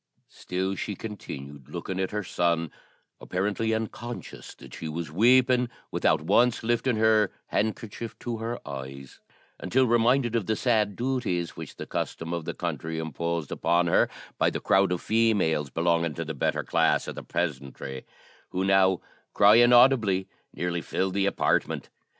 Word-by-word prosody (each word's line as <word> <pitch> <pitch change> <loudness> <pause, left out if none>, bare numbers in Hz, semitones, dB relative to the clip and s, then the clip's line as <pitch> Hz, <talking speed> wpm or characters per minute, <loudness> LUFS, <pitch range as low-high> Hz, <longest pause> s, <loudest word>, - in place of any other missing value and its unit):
Still 95 +1 -3
she 100 +1 -4
continued 70 - -8
looking 95 0 -5
at 95 - 0
her 105 0 -3
son, 85 -3 0 0.5
apparently 105 +4 -1
unconscious 115 +2 -5
that - - -14
she 80 - -6
was 80 0 -5
weeping, 125 +5 +4 0.2
without 80 -1 +2
once 120 +9 +3
lifting 120 +2 +1
her 110 -2 +3 0.2
handkerchief 110 +1 -3
to 120 -2 -4
her 115 +2 -4
eyes, 70 -1 -8 0.4
until 130 +1 +2
reminded 120 +1 +3
of 110 -5 0
the 110 - +1
sad 105 -4 +1
duties 120 -10 -2
which - - -8
the - - -7
custom 80 +1 -4
of 85 -2 -3
the - - -4
country 80 0 -4
imposed 80 0 -3
upon 85 +2 +2
her, 85 - +3 0.3
by - - +4
the - - -4
crowd 95 -1 +3
of 90 - -1
females 105 -10 +2
belonging 85 +1 0
to 85 - -4
the 80 - -4
better 70 - -1
class - - +2
of - - -4
the - - -7
peasantry, 70 -5 -4 0.5
who 95 - -2
now, 95 -1 +3 0.3
crying 115 +4 +7
audibly, 120 -7 +5 0.2
nearly 85 -1 -2
filled 95 +2 -2
the 100 0 +1
apartment. - - 0
95 Hz, 155 wpm, -27 LUFS, 85-115 Hz, 0.5 s, crying